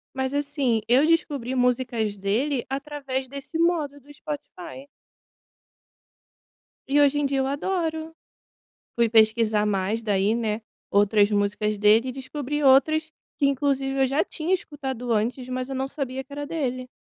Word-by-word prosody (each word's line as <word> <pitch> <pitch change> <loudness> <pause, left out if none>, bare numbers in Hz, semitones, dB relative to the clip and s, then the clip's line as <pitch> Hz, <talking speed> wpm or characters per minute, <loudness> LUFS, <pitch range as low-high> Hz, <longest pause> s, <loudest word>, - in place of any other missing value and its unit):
Mas, 265 +1 -2
assim, 280 -6 0
eu 260 +5 +5
descobri 285 -6 0
músicas 240 -4 0
dele 235 +8 -1
através 275 -1 -4
desse 280 +4 -6
modo 325 -4 +1
do 285 +2 -17
Spotify. 300 0 -8 2.0
E 285 +2 +3
hoje 290 0 +4
em 290 - +1
dia 275 0 0
eu 265 - +1
adoro. 320 +2 -2 0.8
Fui 235 -1 +2
pesquisar 220 -1 +3
mais, 205 +2 0
daí, 205 0 +1
né, 220 -1 -2 0.3
outras 205 0 +4
músicas 205 +1 0
dele, 215 +5 +4
e - - -3
descobri 285 +2 -4
outras, 310 +4 +4 0.3
que 285 - +2
inclusive 270 -1 0
eu 265 - +4
já 275 +4 +1
tinha 340 -1 -2
escutado 265 -8 -3
antes, 240 +4 -1
mas 255 +1 -3
eu 270 - -4
não 265 +1 -1
sabia 265 -2 -4
que 275 - -28
era 290 0 -4
dele. 255 -5 -3
265 Hz, 150 wpm, -25 LUFS, 230-290 Hz, 2.0 s, eu